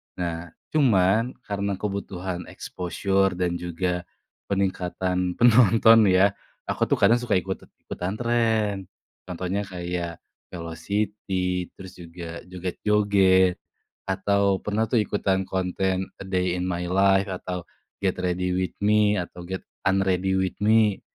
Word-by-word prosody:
nah 85 Hz, -1 st, -3 dB, 0.3 s
cuman 115 Hz, -4 st, +3 dB
karena 100 Hz, -1 st, -2 dB
kebutuhan 95 Hz, -3 st, -4 dB
exposure 95 Hz, +1 st, -1 dB
dan 90 Hz, -1 st, -1 dB
juga, 90 Hz, +1 st, -2 dB, 0.5 s
peningkatan 90 Hz, -1 st, -1 dB
penonton 115 Hz, -1 st, +6 dB
ya 95 Hz, +2 st, +5 dB, 0.4 s
aku -, -, +1 dB
tuh -, -, +1 dB
kadang 120 Hz, -, +5 dB
suka 120 Hz, -, -1 dB
ikut-ikutan 95 Hz, 0 st, -6 dB
tren, 115 Hz, -3 st, +1 dB, 0.5 s
contohnya 90 Hz, +2 st, -2 dB
kayak, 85 Hz, -2 st, -4 dB, 0.3 s
velocity 90 Hz, +1 st, -2 dB
terus 95 Hz, -1 st, -11 dB
juga 85 Hz, -1 st, -8 dB
joget-joget, 95 Hz, 0 st, +2 dB, 0.5 s
atau 100 Hz, 0 st, +1 dB
pernah 105 Hz, +2 st, 0 dB
tuh 115 Hz, 0 st, +2 dB
ikutan 100 Hz, -2 st, 0 dB
konten 95 Hz, 0 st, -1 dB
a -, -, -6 dB
day 90 Hz, -1 st, 0 dB
in 90 Hz, 0 st, -2 dB
my 90 Hz, 0 st, -2 dB
life 95 Hz, +2 st, +3 dB
atau 90 Hz, -2 st, -5 dB, 0.4 s
get 95 Hz, -2 st, +1 dB
ready 90 Hz, 0 st, -1 dB
with 95 Hz, 0 st, -2 dB
me 105 Hz, 0 st, +4 dB
atau 90 Hz, -1 st, -5 dB
get 95 Hz, +1 st, -5 dB, 0.2 s
unready 95 Hz, -1 st, +1 dB
with 95 Hz, -1 st, 0 dB
me, 110 Hz, -1 st, +3 dB
95 Hz, 120 wpm, -25 LUFS, 90-100 Hz, 0.5 s, penonton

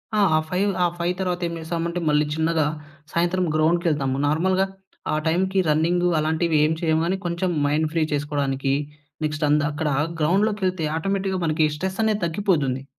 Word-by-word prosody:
ఆ! -, -, +2 dB, 0.2 s
ఆ -, -, +5 dB
5 195 Hz, +3 st, +1 dB
ఆ -, -, +4 dB
5 175 Hz, +1 st, 0 dB
తర్వాత 180 Hz, -1 st, -1 dB
ఏం 170 Hz, -, -5 dB
చేస్తామంటే, 170 Hz, +1 st, -3 dB
మళ్ళీ 150 Hz, 0 st, +3 dB
చిన్నగా 160 Hz, -1 st, +1 dB, 0.5 s
సాయంత్రం 175 Hz, +2 st, +1 dB
గ్రౌండ్‌కెళ్తాము. 155 Hz, -4 st, +1 dB
నార్మల్‌గా 185 Hz, +5 st, +2 dB, 0.5 s
ఆ -, -, +2 dB
టైమ్‌కి 190 Hz, +4 st, +1 dB
రన్నింగు 170 Hz, +4 st, +2 dB
అలాంటివేం 155 Hz, 0 st, +2 dB
చెయ్యము, 160 Hz, -1 st, +2 dB
కానీ 185 Hz, +3 st, 0 dB
కొంచం 175 Hz, +1 st, -1 dB, 0.2 s
మైండ్ 150 Hz, +2 st, +1 dB
ఫ్రీ 165 Hz, -1 st, +2 dB
చేసుకోడానికి, 140 Hz, -2 st, -1 dB, 0.5 s
నెక్స్ట్ 155 Hz, 0 st, -1 dB
అంద 150 Hz, +1 st, +4 dB
అక్కడ 150 Hz, +1 st, -2 dB, 0.3 s
గ్రౌండ్‌లోకెళ్తే 185 Hz, 0 st, +1 dB
ఆటోమేటిక్‌గా 195 Hz, +2 st, -1 dB
మనకి 155 Hz, 0 st, +2 dB
స్ట్రెస్సనేది 205 Hz, +5 st, -1 dB
తగ్గిపోతుంది. 160 Hz, -8 st, 0 dB
165 Hz, 145 wpm, -23 LUFS, 155-185 Hz, 0.5 s, ఆ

